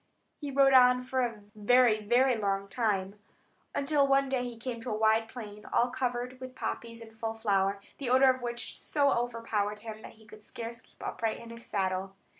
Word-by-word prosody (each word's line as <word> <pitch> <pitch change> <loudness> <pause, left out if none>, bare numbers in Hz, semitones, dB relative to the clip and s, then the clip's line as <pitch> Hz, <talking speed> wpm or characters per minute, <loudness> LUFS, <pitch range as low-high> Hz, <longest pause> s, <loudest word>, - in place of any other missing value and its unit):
He 290 - -5
rode 275 0 +4
on 250 -1 +6
for 260 +1 -1
a 230 -4 -2
very, 215 0 +4
very 245 +4 +3
long 200 -2 -1
time, 200 -2 -1 0.7
till 285 -1 +3
one 275 0 +3
day 260 -2 0
he 240 -2 -7
came 240 +1 -5
into 240 +2 -7
a 215 - -1
wide 220 +1 +3
plain, 210 -3 -9
all 245 +1 +2
covered 250 0 -3
with 255 0 -8
poppies 230 -2 -5
in 225 -1 -11
full 225 0 -4
flower, 200 -2 +1 0.2
the 270 -4 -3
odour 260 +1 +6
of 255 0 -6
which 240 0 -5
so 285 -2 +2
overpowered 225 -3 -2
him, 220 -1 -7
that - - -11
he 220 0 -20
could 215 0 -14
scarce 230 +2 -7
keep - - -13
upright 225 -1 -2
in 230 - -10
his 230 0 -11
saddle. 190 -1 -2
230 Hz, 200 wpm, -30 LUFS, 215-255 Hz, 0.7 s, on